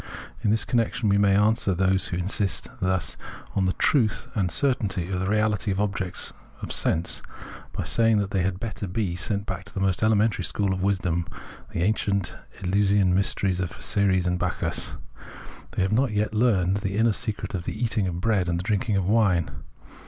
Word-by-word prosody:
In - - +2
this 110 +1 +1
connection 115 -2 0
we 100 0 +3
may 100 -1 +4
answer 105 -2 +2
those 95 +1 +1
who 90 - -3
thus 90 +3 0
insist 95 -7 0 0.9
on 95 - +2
the 95 - +1
truth 115 -8 +2
and 95 -4 0
certainty 100 -10 0
of 90 - -1
the 95 - -1
reality 105 0 +1
of 95 0 0
objects 100 -3 -2 0.3
of - - -4
sense, 80 +2 +1 0.5
by - - -3
saying 115 -1 +3
that 100 -1 -1
they 95 - +1
had 90 0 -1
better 105 -2 -5
be 90 -1 -2
sent 100 +2 -2
back 95 -1 -4
to 100 - -15
the - - -2
most 95 -2 +1
elementary 110 -2 +2
school 100 +2 0
of 95 - -3
wisdom, 90 -4 0 0.4
the 85 - -1
ancient 100 -1 0 0.3
Eleusinian 100 0 +3
mysteries 95 -1 +1
of 90 -3 -4
Ceres 95 -3 +2
and 90 0 0
Bacchus; - - -2 0.8
they - - +1
have 95 +2 0
not 125 0 +2
yet 105 +1 0
learnt 100 -4 +2
the 100 0 -2
inner 115 0 +3
secret 110 -1 -3
of 90 -3 -3
the 105 - -4
eating 110 -4 0
of 85 -1 -3
bread 95 -3 +1
and 85 - 0
the 85 - -3
drinking 105 +1 0
of 95 -2 +1
wine. 95 - +2
100 Hz, 190 wpm, -25 LUFS, 95-105 Hz, 0.9 s, may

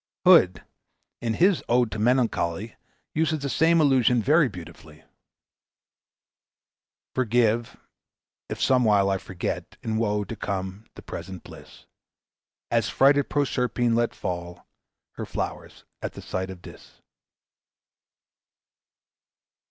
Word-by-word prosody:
Hood, 165 - +6 0.6
in 115 -2 -1
his 185 +1 +3
"Ode 120 -1 +3
to 110 - -4
Melancholy," 110 -4 0 0.4
uses 160 0 +1
the 140 -1 -4
same 165 +7 +3
allusion 130 -5 +4
very 145 +4 +3
beautifully: 90 -5 -12 2.1
"Forgive, 120 -2 +1 0.7
if - - -5
somewhile 105 -7 +3
I 95 - 0
forget, 90 -1 -5
In 110 -1 -2
woe 105 -2 0
to 100 - -7
come 95 +1 -4
the - - -11
present 95 -3 -8
bliss; - - -14 0.9
As 115 -1 +1
frighted 140 +1 +3
Proserpine 125 -4 0
let 120 0 +1
fall 85 -1 -5 0.5
Her - - -4
flowers - - -5 0.2
at - - -4
the - - -9
sight 95 0 -3
of 95 -2 -10
Dis." - - -14
115 Hz, 110 wpm, -25 LUFS, 100-130 Hz, 2.1 s, Hood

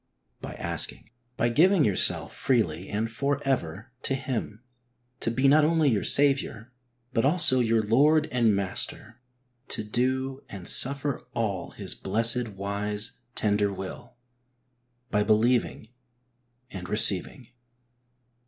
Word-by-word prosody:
By - - -8
asking. 105 - -3 0.3
By 120 - 0
giving 165 +5 +3
yourself 100 - +2
freely 95 - -1
and 110 +2 -2
for 140 +5 -3
ever 110 -3 -3
to 135 - -2
Him, 125 -4 -6 0.6
to - - -2
be 130 +4 0
not 150 +2 +4
only 155 -2 +2
your 100 -5 -1
Saviour, 135 -4 +2 0.4
but 115 - 0
also 145 -3 +7
your 115 -2 +1
Lord 150 +8 +2
and 115 -4 +1
Master; 100 +4 -2 0.5
to - - -4
do 130 +4 -2
and 95 -3 -9
suffer 140 +1 -1
all 105 -5 -3
His - - -6
blessed, 115 +4 +2
wise, 105 +2 -5 0.2
tender 105 -1 0
will. 95 +3 -9 1.0
By 105 - +1
believing 110 +1 0 0.8
and 90 -2 -8
receiving. 105 +4 +1
115 Hz, 120 wpm, -25 LUFS, 105-135 Hz, 1.0 s, also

